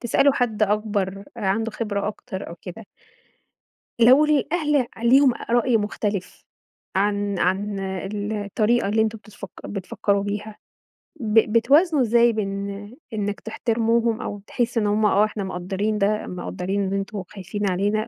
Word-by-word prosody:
تسألوا 265 +3 +3
حَد 225 -4 0
أكبر 205 -2 0
آآ، 230 - -7
عَنده 215 +3 0
خبرة 210 -2 -2
أكتر 210 -2 -7
أو 170 - -8
كده. 200 +4 -9 1.1
لو 255 +6 +7
الأهل 300 -2 +1 0.2
ليهم 255 +1 +5
أ - - -9
رأي 240 0 +3
مختلِف 205 -2 -3 0.5
عن 205 0 0
عن 195 +3 0
ال 195 +2 -4
الطريقة 210 +2 +1
اللي 220 +2 +2
أنتم 220 0 -2
بتفكّ 210 -1 -10 0.2
بتفكّروا 200 0 -1
بيها، 205 +1 -4 0.6
ب 225 -2 +4
بتوازنوا 290 +6 +4
إزاي 235 0 +4
بين 200 -2 -3 0.4
إنك 205 -1 -2
تحترموهم 230 0 0
أو 205 -1 -5
تحس 240 -1 -1
إن 215 -2 +2
هُم، 210 +1 +2
آه 210 0 +4
إحنا 215 -1 -4
مقدّرين 190 +3 -2
ده، 210 +1 0
مقدّرين 185 +2 -3
إن 195 0 -2
أنتم 195 0 -3
خايفين 200 +2 -4
علينا، 205 +4 0
210 Hz, 145 wpm, -23 LUFS, 200-230 Hz, 1.1 s, لو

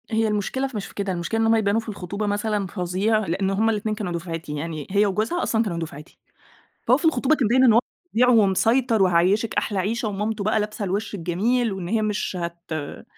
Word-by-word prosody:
هي 225 -1 +1
المشكلة 215 +6 -1
ف 265 - -12
مش 205 - -3
في - - -15
كده، 200 -1 -2
المشكلة 175 +5 -2
إن - - +3
هم 225 0 +4
يبانوا 215 0 +2
في 220 - -9
الخُطوبة 200 +1 -4
مثلًا 205 -1 -1
فظيع، 185 +4 0
لإن 190 +4 0
هم 210 +3 +2
الاتنين 215 0 -1
كانوا 205 -4 -4
دُفعتي، 165 -3 -5
يعني 155 -1 -5
هي 205 +1 +4
وجوزها 215 - -1
أصلًا 225 0 +1
كانوا 185 -6 -3
دُفعتي. 155 -1 -8 0.7
فهو - - +5
في - - -7
الخطوبة 315 -2 +3
كان 250 -8 +1
باين 260 +3 +4
إن 240 - +7
هو 225 - +6 0.4
فظيع 250 +2 +4
ومسيطر 225 +1 +3
وهيعيّشك 185 +5 +2
أحلى 205 - -1
عيشة 215 +4 -1
ومامته 210 +1 -2
بقى 215 +1 +2
لابسة 210 0 -3
الوِش 200 +3 -2
الجميل، 205 +7 0
وإن 185 -3 -5
هي 220 +2 +1
مش 210 -2 -2
هت 170 0 -5
آآ 150 -2 -5
210 Hz, 215 wpm, -23 LUFS, 185-225 Hz, 0.7 s, إن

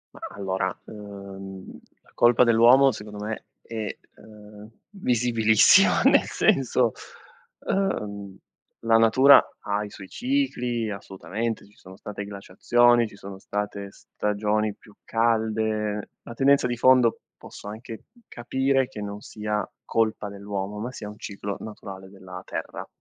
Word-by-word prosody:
Mah - - -9
allora, 95 -1 -2
ehm, 100 -2 -10 0.2
la - - -25
colpa 120 +1 +5
dell'uomo 120 +4 +6
secondo 105 -2 -8
me 110 0 -5 0.2
è, 110 -3 -5 0.2
ehm, 105 0 -14 0.2
visibilissima, 120 - +4
nel - - +5
senso, 125 -3 +2 0.8
ehm, 100 - -2 0.5
la 115 0 +5
natura 130 +5 +7 0.2
ha 105 +1 -2
i 105 - -7
suoi 100 -1 -11
cicli, 125 - -1
assolutamente, 105 +3 -5
ci 105 - -23
sono 95 0 -14
state 105 0 -7
glaciazioni, 115 +4 +2
ci 105 - -15
sono 95 -1 -10
state 100 0 -4
stagioni 105 +1 -2
più 105 - -19
calde; 110 -2 0
la 120 - -9
tendenza 140 +2 +3
di 120 -1 -3
fondo, 125 -1 +4 0.2
posso - - -12
anche 110 +1 -9 0.2
capire 130 +2 0
che 105 - -9
non 100 0 -6
sia 105 -1 -4 0.2
colpa 110 -2 -1
dell'uomo, 100 0 -5
ma 120 +4 -4
sia 105 -4 -7
un 105 - -11
ciclo 100 -1 -6
naturale 95 -3 -9
della 95 -2 -10
terra. - - -6
105 Hz, 130 wpm, -25 LUFS, 100-120 Hz, 0.8 s, natura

